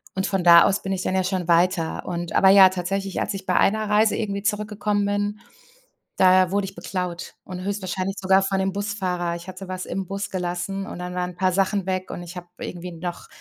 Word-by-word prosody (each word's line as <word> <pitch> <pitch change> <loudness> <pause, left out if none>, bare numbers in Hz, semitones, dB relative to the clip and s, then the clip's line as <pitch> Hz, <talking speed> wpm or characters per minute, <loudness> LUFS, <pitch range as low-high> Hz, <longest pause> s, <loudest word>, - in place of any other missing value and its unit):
Und 190 0 0
von 195 -2 -1
da 170 -1 +9
aus 195 - +1
bin 195 - -4
ich 185 -1 -2
dann 185 - -1
ja 190 - +2
schon 185 -2 -2
weiter. 170 -1 +1
Und 175 -1 -4
aber 190 - +5
ja, 190 -1 +8
tatsächlich, 190 +1 -3
als - - -2
ich 195 -1 -7
bei 185 - 0
einer 215 +1 +2
Reise 215 +1 +3
irgendwie 200 -2 -2
zurückgekommen 210 -1 -1
bin, 205 +1 -1 0.8
da 185 -1 +5
wurde 200 0 0
ich 195 0 -9
beklaut 180 -2 -5
und 185 -1 -7
höchstwahrscheinlich 195 -1 -3
sogar 190 0 +4
von 195 0 -1
dem 190 0 0
Busfahrer. 185 -4 -2
Ich 170 +1 -10
hatte 185 +1 -8
was 185 0 -4
im 195 0 -4
Bus 195 +1 -4
gelassen 180 +1 -3
und - - -7
dann 180 0 -5
waren 180 0 -2
'n - - -16
paar 185 0 +1
Sachen 195 +1 0
weg 185 0 -2
und 175 - -6
ich 175 +1 -10
habe 175 0 -8
irgendwie 180 0 -6
noch 175 +1 -6
190 Hz, 225 wpm, -23 LUFS, 180-195 Hz, 0.8 s, da